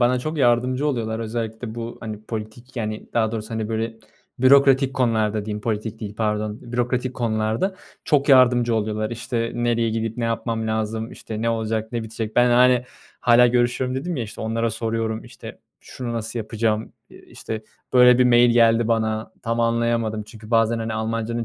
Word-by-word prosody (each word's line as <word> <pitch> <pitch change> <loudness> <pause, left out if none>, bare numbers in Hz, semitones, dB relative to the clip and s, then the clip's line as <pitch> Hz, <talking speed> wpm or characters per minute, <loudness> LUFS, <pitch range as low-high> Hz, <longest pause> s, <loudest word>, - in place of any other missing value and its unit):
bana 125 +1 +3
çok 155 +4 -4
yardımcı 125 +3 +2
oluyorlar. 115 -5 -1
Özellikle 110 0 -4
bu, 115 0 -6
hani, 110 -2 -7
politik, 110 +3 -7
yani, 110 -2 -4
daha 110 -2 +1
doğrusu, 110 0 -5
hani, 110 -1 -3
böyle, 115 0 -2 0.4
bürokratik 135 +1 +5
konularda 110 -4 +1
diyeyim 105 0 -4
politik 105 -1 -3
değil, 105 -1 -6
pardon, 105 -1 -1
bürokratik 125 +1 -1
konularda 110 - -1 0.3
çok 145 -2 +2
yardımcı 125 -3 +5
oluyorlar. 110 0 -1
İşte, 115 0 -3
nereye 120 -1 +1
gidip 115 0 -2
ne 120 - -2
yapmam 115 0 -2
lazım, 110 +1 -2
işte, 110 0 -6
ne 115 - +1
olacak 110 0 -2
ne 120 -1 -2
bitecek? 110 0 -6
Ben, 120 0 +5
hani, 125 0 +5 0.4
"Hâlâ 120 0 +6
görüşüyorum." 125 +1 +1
dedim, 170 +5 -3
ya, 125 - -2
işte, 105 - -9
onlara 115 +1 -1
soruyorum, 110 0 -2
işte, 120 -1 -11 0.2
"Şunu 120 -2 -6
nasıl 115 0 -3
yapacağım? 110 0 -1 0.2
Eee, - - -14
işte, 110 -1 -6 0.3
böyle 125 0 +7
bir 125 - +5
mail 120 0 +5
geldi 115 -1 +4
bana 110 -1 0
tam 115 +1 -1
anlayamadım." 115 -2 0
Çünkü 110 0 -13
bazen, 115 0 +3
hani, 110 -1 -3
Almancanın 115 +1 -2
115 Hz, 170 wpm, -22 LUFS, 110-120 Hz, 0.4 s, böyle